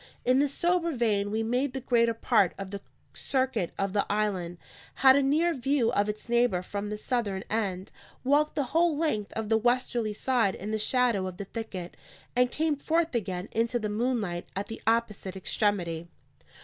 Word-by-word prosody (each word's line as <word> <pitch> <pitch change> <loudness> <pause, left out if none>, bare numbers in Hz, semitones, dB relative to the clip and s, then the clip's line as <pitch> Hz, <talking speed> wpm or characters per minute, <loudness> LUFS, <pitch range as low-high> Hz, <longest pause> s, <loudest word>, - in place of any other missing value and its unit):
In 255 +2 +4
this 285 -1 +2
sober 340 +1 +1
vein 210 -5 +1
we 220 +2 -1
made 250 +4 0
the 265 - -3
greater 235 -2 +2
part 220 -5 +2
of 195 -1 -6
the 200 -1 -5 0.3
circuit 260 -9 -1
of 195 -1 -1
the 205 - +2
island; 190 -5 -1 0.4
had 265 -1 +7
a 280 - +4
near 310 +5 +2
view 265 -3 +1
of 205 -3 +1
its 210 +2 -5
neighbour 235 -6 +2
from 205 +2 -4
the 210 - -3
southern 210 -5 -2
end; 195 -4 -2 0.3
walked 290 +3 +2
the 290 - +1
whole 330 -2 +3
length 255 -11 -1
of 225 -1 -3
the 220 0 +4
westerly 240 -2 +1
side 230 -5 +1
in 210 +3 -5
the 220 - -1
shadow 235 -4 +2
of 180 -1 -7
the 200 - -5
thicket; 195 -5 -6 0.4
and 250 0 +4
came 310 +3 0
forth 325 +3 0
again 190 -5 -2
into 230 +2 +1
the 215 -3 -2
moonlight 210 -6 -1
at 195 +1 -2
the 225 - -8
opposite 220 -4 0
extremity. 180 -4 -1
225 Hz, 185 wpm, -28 LUFS, 200-260 Hz, 0.4 s, had